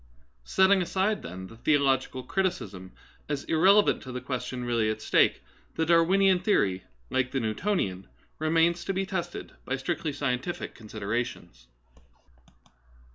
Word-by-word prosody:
^ - - -29 0.4
Setting 190 - +4
aside, 190 +4 0
then, 90 +2 -7
the 115 +4 -13
theological 135 -1 +1
criticism 100 - -2 0.4
as 145 -1 -2
irrelevant 195 +6 +4
to 130 - -8
the 125 - -4
question 125 -1 -4
really 115 -2 +1
at 110 - -2
stake, - - +2 0.3
the 160 - +1
Dar 170 +1 +5
winian 190 +1 +3
theory, 95 - +1 0.3
like 125 -1 +1
the 135 - -1
Newtonian, 110 - -1 0.3
remains 165 +2 +2
to 195 - -1
be 190 +1 -1
tested 175 -2 -4
by 130 - -2
strictly 155 +3 -2
scientific 140 +3 -3
considerations. 110 - -5
140 Hz, 135 wpm, -28 LUFS, 115-180 Hz, 0.4 s, Dar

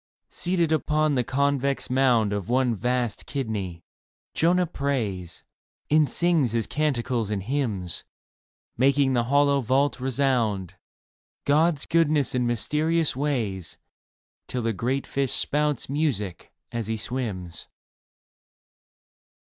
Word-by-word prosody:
Seated 175 -3 0
upon 155 -1 +2
the 125 -2 +2
convex 140 +1 0
mound 125 -5 +3
Of 100 0 -3
one 125 -1 +2
vast 120 0 -1
kidney, 100 - -4 0.5
Jonah 180 +2 +3
prays 120 - -3 0.5
And 155 -1 +4
sings 165 -9 +2
his 115 -1 +1
canticles 125 -6 -1
and 100 -3 -2
hymns, 105 - -2 0.7
Making 135 +1 +3
the 120 -2 +1
hollow 140 +1 +3
vault 135 +4 +1
resound 125 - 0 0.7
God's 150 +1 +3
goodness 155 -4 +2
and 125 -1 +1
mysterious 150 +7 +1
ways. 115 - -2 0.7
Till 125 -2 -3
the 115 0 0
great 130 +6 -1
fish 135 -2 -1
spouts 150 -2 0
music 130 - -2 0.2
as 115 -3 -3
he 110 0 -1
swims. 105 -8 -4
130 Hz, 110 wpm, -25 LUFS, 110-145 Hz, 0.7 s, And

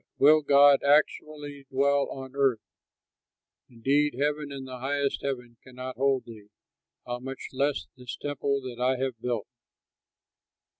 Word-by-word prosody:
"But - - +3
will 155 +1 +7
God 140 -1 +6
actually 145 -1 +1
dwell 140 +1 +2
on 135 0 -8
earth? 135 -6 +2 1.1
Indeed 135 +4 +1
heaven 145 +2 -1
and 135 -1 -7
the 130 -1 -8
highest 140 +2 -1
heaven 125 -4 -4
cannot 130 0 -8
hold 135 -1 +1
thee; 110 -3 -12 0.6
how 120 0 -4
much 135 +1 -7
less 140 +2 0
this 125 -1 -8
temple 140 -1 -2
that 125 -2 -8
I 130 +1 +2
have 130 -3 -3
built!" 120 -4 -2
135 Hz, 140 wpm, -27 LUFS, 125-140 Hz, 1.1 s, will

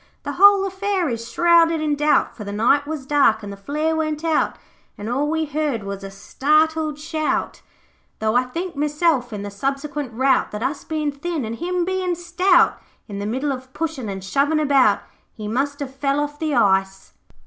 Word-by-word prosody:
The - - -3
whole 400 0 +6
affair 385 -3 -1
is 230 0 -5
shrouded 335 0 +4
in 305 -1 0
doubt, 295 +1 +2
For 215 - -8
the 200 - -6
night 260 +8 +2
was 305 -4 -5
dark 270 -7 +3
and 200 -1 -6
the - - -7
flare 300 +10 -2
went 310 -1 -2
out, 320 -2 +1 0.4
And 205 - -6
all 275 +5 0
we 320 0 0
heard 290 -6 -2
was 200 0 -6
a 195 - -6
startled 305 +9 +1
shout, 310 0 -2 0.6
Though 220 +1 0
I 250 +1 +3
think 340 +7 -5
meself, 295 -3 +1
in 205 -2 -5
the 205 - -6
subsequent 275 +4 -3
rout, 265 +3 +2
That 210 +2 -5
us 280 +1 -2
bein' 305 -2 -2
thin, 300 -1 -4
an' 220 - -4
him 350 +6 -2
bein' 370 -1 -1
stout, 350 +1 +2 0.3
In 200 -2 -6
the 200 - -3
middle 265 +6 -1
of 260 0 -7
pushin' 305 -8 -3
an' 195 -1 -5
shovin' 280 +10 +1
about, 280 -3 +3 0.3
He 215 -2 -7
MUST 280 +6 -2
HAVE 265 -2 -5
FELL 275 +1 0
OFF 295 0 -4
THE 310 -3 -1
ICE.' 195 -3 +1
290 Hz, 190 wpm, -21 LUFS, 240-320 Hz, 0.6 s, whole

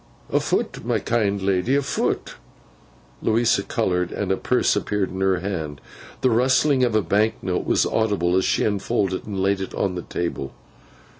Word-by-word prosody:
'Afoot, - - 0
my - - +1
kind 100 -4 0
ledy, 100 +7 +1
afoot.' 140 -1 -1 0.9
Louisa 115 -1 +2
coloured, 90 -5 -1
and 100 -2 -2
a - - +3
purse 125 +3 +1
appeared 105 -1 -1
in 95 +1 -5
her 95 -2 +2
hand. 80 -7 -4 0.4
The 130 - +3
rustling 130 +3 +3
of 120 -3 +1
a 110 - +3
bank 110 +3 +2
note 90 -2 -2
was - - +3
audible, 100 -6 +1
as 95 - +3
she - - +1
unfolded 100 -2 -1
one 105 - -6
and 95 - -1
laid 100 0 +1
it 95 - -5
on 95 -2 0
the 90 - -4
table. 85 -6 -4
100 Hz, 170 wpm, -23 LUFS, 95-110 Hz, 0.9 s, a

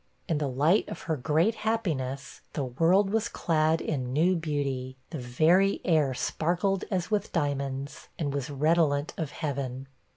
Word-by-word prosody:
In 160 -5 0
the 145 - 0
light 150 +10 +2
of - - -7
her 160 - -1
great 155 - +2
happiness, 165 - -2
the 145 - -1
world 170 +10 +3
was 225 +1 0
clad 160 -1 +1
in 130 -5 -2
new 170 +7 +3
beauty, 140 -5 -2
the 160 - -4
very 160 +11 +3
air 150 -7 +2
sparkled 180 +8 0
as 185 0 -2
with 210 -1 0
diamonds, 140 -2 -2
and 145 -4 -2
was 140 +1 -3
redolent 150 0 +2
of 160 -3 -3
heaven. 135 -3 -4
155 Hz, 155 wpm, -28 LUFS, 140-175 Hz, -, world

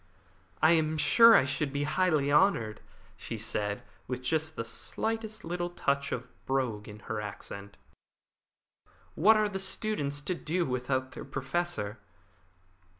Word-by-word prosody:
"I 160 - +7
am 160 -1 +2
sure 230 +9 +7
I - - +6
should 135 +1 -1
be 140 +1 -1
highly 155 -2 +2
honoured," 145 - +3 0.4
she - - -6
said, 105 -1 -3 0.2
with 125 0 -4
just 155 +3 -1
the 115 - -3
slightest 220 - -3
little 175 +1 -2
touch 140 -5 -1
of 125 +1 -3 0.2
brogue 125 -6 -1
in 105 +1 -11
her 110 0 -4
accent. 100 -1 -8 1.4
"What 215 +7 +5
are 215 0 +3
the 195 -2 -4
students 190 -7 -2
to 180 - -2
do 170 +1 -1
without 130 0 -1
their - - -8
Professor?" 135 -6 -2
145 Hz, 140 wpm, -30 LUFS, 125-175 Hz, 1.4 s, I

